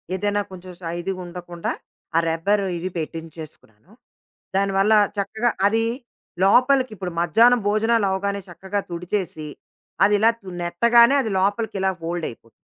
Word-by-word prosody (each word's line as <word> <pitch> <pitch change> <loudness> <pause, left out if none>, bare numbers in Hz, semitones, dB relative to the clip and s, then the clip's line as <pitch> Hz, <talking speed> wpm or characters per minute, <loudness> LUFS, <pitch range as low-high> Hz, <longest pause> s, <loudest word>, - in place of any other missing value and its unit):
ఏదైనా 205 +2 0
కొంచెం 185 0 -10
శై 170 0 -4
ఇది 195 - -2
ఉండకుండా 175 -1 -5 0.5
ఆ - - +6
రబ్బర్ 195 +6 +1
ఇది 180 +2 -4
పెట్టించేసుకున్నాను. 160 - -9 0.7
దానివల్ల 195 +2 +2 0.2
చక్కగా 220 +4 0 0.2
అది 225 +2 +1 0.6
లోపలికి 255 +5 +4
ఇప్పుడు 180 -2 -5
మధ్యాహ్నం 230 +9 +5
భోజనాలు 225 +1 +2
అవ్వగానే 200 +1 -2
చక్కగా 190 +3 -4
తుడిచేసి 170 -3 -4 0.6
అదిలా 210 +2 +4 0.3
నెట్టగానే 235 +9 +5
అది 225 - -3
లోపలికిలా 200 0 0
ఫోల్డ్ 170 0 -3
అయిపోతుంది. 115 0 -15
195 Hz, 120 wpm, -22 LUFS, 175-215 Hz, 0.7 s, ఆ